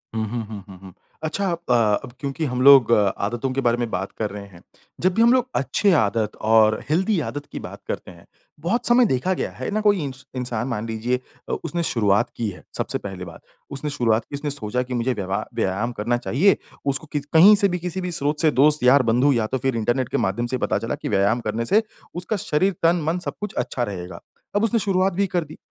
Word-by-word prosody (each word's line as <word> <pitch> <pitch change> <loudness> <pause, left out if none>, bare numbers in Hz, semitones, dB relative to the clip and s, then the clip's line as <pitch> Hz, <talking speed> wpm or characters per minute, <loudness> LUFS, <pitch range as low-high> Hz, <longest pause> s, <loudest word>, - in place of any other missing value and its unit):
हुँ, 110 - 0
हुँ, 115 -1 -3
हुँ, 105 -3 -8
हुँ, 95 -2 -12
हुँ, 95 -2 -12 0.3
अच्छा 195 +5 -1
आप 120 -10 +1
क्योंकि 140 +3 -3
हम 125 -1 -2
लोग 135 -4 +7
आदतों 110 +4 +1
के 135 - -1
बारे 120 -1 +2
में 120 -1 -2
बात 95 +2 -3
कर 105 - -1
रहे 100 0 -8
हैं। 90 -3 -16 0.4
जब 185 +1 +2
भी 225 - +2
हम 235 +2 +6
लोग 255 -1 +2
अच्छी 140 - +2
आदत 105 0 -1
और 110 0 +4
हेल्दी 185 +5 +2
आदत 145 +1 -5
की - - -5
बात - - -9
करते - - -5
हैं, 85 -1 -17 0.3
बहुत 190 +10 -1
समय 240 +1 +5
देखा 180 - 0
गया, - - -3
है - - -5
ना? 215 - 0
कोई 205 -5 +2
इन 140 -2 -4 0.2
इंसान 120 -1 -3
मान 115 -3 -3
लीजिए 115 +3 -1 0.3
अ, - - -2
उसने 170 0 -2
शुरुआत 110 -3 +2
की 115 - -1
है 90 - -11
सबसे - - -1
पहली 95 -2 -7
बात - - -12 0.3
उसने 140 +2 -3
शुरुआत 115 -5 +1
की, 140 - -7
उसने 145 +1 -3
सोचा 125 -3 -1
की 125 - -7
मुझे 125 +1 0
व्यवहार 95 -3 -3
व्यायाम 100 +6 -1
करना 120 +3 +1
चाहिए, 155 - +2 0.3
उसको 140 +3 -1
किसी 145 -1 -3
कहीं 190 +7 +8
से 200 -1 +4
भी 180 0 -2
किसी 180 +2 -4
भी 180 -1 -3
स्रोत 150 -2 -1
से 155 - +4
दोस्त 145 +1 +4
यार 130 +2 +6
बंधू 130 +5 +3
या 115 -3 +1
तो 130 - -2
फिर 135 -1 -1
इंटरनेट 120 +3 0
के - - -1
माध्यम 105 +6 -1
से 130 - -1
पता - - 0
चला - - -3
कि - - -6
व्यायाम 100 +4 +2
करने 115 +2 -1
से, 215 - +3 0.3
उसका 180 +5 -2
शरीर 185 +3 +1
तन, 170 +1 +3
मन 165 +3 0
सब 180 - -4
कुछ 210 -1 -4
अच्छा 125 0 -1
रहेगा। 95 -4 -6 0.4
अब 205 - +2
उसने 230 +1 +2
शुरुआत 195 -2 +1
भी 200 +2 +1
कर 175 -2 -1
दी 155 0 -12
130 Hz, 235 wpm, -22 LUFS, 110-170 Hz, 0.4 s, कहीं